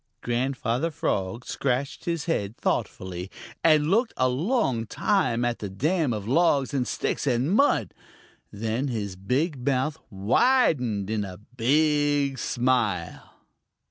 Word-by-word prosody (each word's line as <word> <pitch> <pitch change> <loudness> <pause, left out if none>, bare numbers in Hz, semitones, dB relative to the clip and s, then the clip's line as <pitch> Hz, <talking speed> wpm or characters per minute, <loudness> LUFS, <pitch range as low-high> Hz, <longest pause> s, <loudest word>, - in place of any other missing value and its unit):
Grandfather 125 +3 -1
Frog 120 - -2
scratched 135 +1 -2
his 170 -2 -2
head 110 - -2
thoughtfully 90 0 -2 0.3
and 155 0 +4
looked 230 +4 +2
a 130 - +3
long 130 - 0
time 125 - +1
at 120 -1 -1
the 100 - -5
dam 150 - 0
of 105 -2 -4
logs 145 0 +2
and 130 -3 0
sticks - - -2
and 130 +4 +1
mud. 205 - +3 0.6
Then 115 +6 -2
his 105 -7 -3
big 130 - -1
mouth 140 +3 0
widened 110 - +2
in 110 -2 0
a 95 -2 -7
big 140 - +1
smile. 115 -10 -1
130 Hz, 125 wpm, -26 LUFS, 110-150 Hz, 0.6 s, and